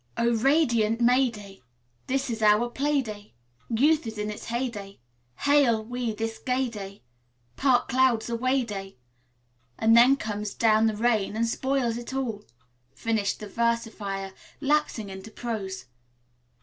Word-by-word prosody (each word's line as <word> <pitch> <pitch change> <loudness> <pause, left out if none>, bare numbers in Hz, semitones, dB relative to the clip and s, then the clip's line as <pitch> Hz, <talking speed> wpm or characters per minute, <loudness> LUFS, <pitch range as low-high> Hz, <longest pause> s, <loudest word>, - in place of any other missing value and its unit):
"Oh, 235 0 +2
radiant 235 -4 +2
May 250 +2 +4
day, 200 -3 -12 0.5
This 270 -1 -1
is 225 -1 -4
our 215 +3 +4
play 285 +1 +1
day. 210 - -9 0.3
Youth 285 +4 +2
is 220 -1 -6
in 210 0 -2
its 210 - -8
hey 240 +3 -1
day; 200 -4 -9 0.4
Hail 270 -7 +3
we 245 0 -3
this 225 +1 -4
gay 255 0 0
day; 200 -3 -9 0.5
Park 255 -3 +2
clouds 255 -3 +2
away 255 +3 +1
day. 195 - -7 0.8
"And 225 +1 +4
then 245 +4 +7
down - - -13
comes 210 -3 -4
the 220 -1 +3
rain 220 -3 +1
and 230 +1 +1
spoils 255 -1 0
it 240 +2 -7
all," 230 -6 -3 0.5
finished 220 -3 -1
the 210 - -6
versifier, 215 -4 -2 0.3
lapsing 285 -7 0
into 190 +3 -9
prose. 210 - -5
230 Hz, 145 wpm, -26 LUFS, 210-255 Hz, 0.8 s, then